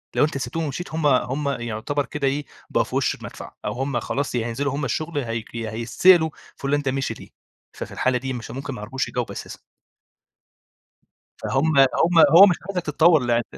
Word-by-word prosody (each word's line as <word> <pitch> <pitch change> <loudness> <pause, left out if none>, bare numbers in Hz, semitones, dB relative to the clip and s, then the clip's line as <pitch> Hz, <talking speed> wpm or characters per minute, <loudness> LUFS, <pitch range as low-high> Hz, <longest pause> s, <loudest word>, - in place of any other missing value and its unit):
لو - - +4
أنت 155 - -3
سبتهم 165 +4 -3
ومشيت 155 +4 -4
هُم 160 -2 +1
هُم 140 +1 +1
يعتبر 120 +3 -2
كده 145 -2 -2
إيه 145 +2 -1 0.2
بقوا - - +2
في - - -7
وش - - +1
المدفع - - -10
أو - - -1
هُم 135 -1 -2
خلاص 140 +3 -3
يا 115 -2 0
هينزلوا 135 +4 -2
هُم 145 0 -2
الشغل 155 +6 -3
يا 135 -4 -2
هيك 115 0 -5
هيتسئلوا 115 +10 +3 0.3
فلان 145 +1 -1
ده 135 -2 -1
مشي 135 0 -2
ليه؟ - - -13 0.4
ففي - - -7
الحالة 130 -1 +1
دي 130 +1 -4
مش 120 -2 -7
ممكن 135 +3 -5
ما 120 - -8
يعرفوش 130 +5 -3
يجاوبوا 125 -2 -3
أساسًا. - - -8 1.8
فهُم 140 +3 +1
هُم 165 +6 +4 0.2
هو 195 +3 +11
مش 180 -4 +2
عايزك 185 -3 -2
تتطور 160 +2 +4
لأن 120 -1 +2
135 Hz, 190 wpm, -23 LUFS, 125-150 Hz, 1.8 s, هو